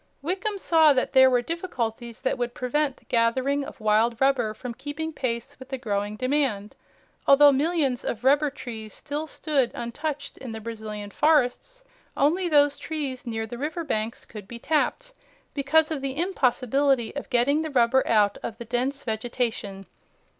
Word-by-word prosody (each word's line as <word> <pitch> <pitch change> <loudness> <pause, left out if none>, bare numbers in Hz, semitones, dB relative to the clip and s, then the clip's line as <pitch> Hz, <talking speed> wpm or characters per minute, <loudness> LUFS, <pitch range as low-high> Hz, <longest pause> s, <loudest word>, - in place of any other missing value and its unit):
Wickham 380 +5 -2
saw 320 -5 +5
that 255 0 0
there 260 -1 +7
were 245 -1 +2
difficulties 240 -8 -4
that 260 - 0
would 240 0 -2
prevent 275 +2 -1
the - - -25
gathering 260 +5 +1
of 285 - -9
wild 220 +2 +2
rubber 265 -5 +2
from 250 +1 -6
keeping 315 +5 -5
pace 235 -5 -3
with 260 0 -11
the 265 - -3
growing 205 -3 -2
demand. 255 -5 -1 0.5
Although 285 +1 +8
millions 280 -3 0
of 235 - -4
rubber 285 +3 +4
trees 225 -6 -8
still 300 +2 -4
stood 285 -6 0
untouched 285 +4 -5
in 245 -4 -7
the 220 - -5
Brazilian 215 -2 -6
forests, 310 - +1 0.3
only 345 +6 +2
those 290 -2 +4
trees 280 -6 -4
near 225 -1 -2
the 235 +2 -8
river 315 +4 -3
banks 220 -6 -3
could 210 -4 -10
be 235 - -7
tapped 320 - -1 0.4
because 310 +3 +2
of 300 -4 -2
the 275 0 -3
impossibility 270 - +1
of 285 - -6
getting 270 +4 +2
the 315 - -3
rubber 260 -1 +3
out 210 -2 +3
of 225 - -5
the 235 - -8
dense 255 +4 -2
vegetation. 220 -3 -3
260 Hz, 165 wpm, -25 LUFS, 230-295 Hz, 0.5 s, Although